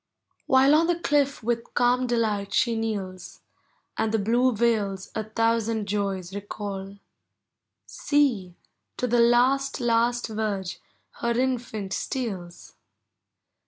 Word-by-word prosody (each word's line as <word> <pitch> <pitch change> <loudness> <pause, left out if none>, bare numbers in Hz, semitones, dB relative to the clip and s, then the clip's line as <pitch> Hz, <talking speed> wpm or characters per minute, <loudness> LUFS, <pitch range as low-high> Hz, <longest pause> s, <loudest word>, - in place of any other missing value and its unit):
While 265 +2 +5
on 325 +2 +4
the 350 -1 +1
cliff 285 -5 +1
with 235 0 -2
calm 245 +1 +3
delight 215 -4 0
she 235 -2 +2
kneels, 200 -5 -4 0.6
And 220 - +1
the 225 - +2
blue 240 +5 +2
vales 210 -4 0
a 220 - -3
thousand 225 -1 0
joys 195 -3 -2
recall, 200 -1 -6 0.9
See, 240 - 0 0.4
to - - -1
the 240 0 +2
last, 255 +4 +3
last 240 0 +1
verge 210 -4 -3 0.4
her 235 0 0
infant 235 -6 -2
steals! 195 -10 -5
225 Hz, 115 wpm, -25 LUFS, 200-245 Hz, 0.9 s, While